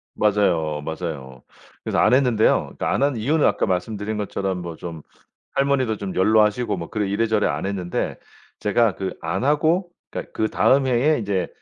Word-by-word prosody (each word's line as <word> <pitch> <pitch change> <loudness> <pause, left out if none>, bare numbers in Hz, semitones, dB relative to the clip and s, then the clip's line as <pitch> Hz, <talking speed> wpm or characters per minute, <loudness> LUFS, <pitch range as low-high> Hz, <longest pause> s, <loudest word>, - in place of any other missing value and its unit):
맞아요, 85 -8 +1
맞아요. 75 -6 -6 0.4
그래서 - - -1
안 110 - +4
했는데요. 125 -5 +3
그 - - -2
안 135 - +1
한 140 -1 +2
이유는 145 +8 +2
아까 - - +2
말씀드린 105 +3 -2
것처럼 95 -3 -2
뭐 85 -2 -6
좀 85 -2 -8 0.5
할머니도 135 -5 +1
좀 100 -2 -5
연로하시고 105 +4 +3
뭐 85 - -6
그래 105 -2 -1
이래저래 110 +1 +1
안 - - -2
했는데 95 -3 -3 0.4
제가 105 0 +2
그 95 -1 -4
안 90 +6 -2
하고 160 +6 +2 0.2
그러니까 - - -6
그다음 110 +6 +2
해에 130 +5 +2
이제 100 -4 -1
105 Hz, 355 characters per minute, -22 LUFS, 90-120 Hz, 0.5 s, 안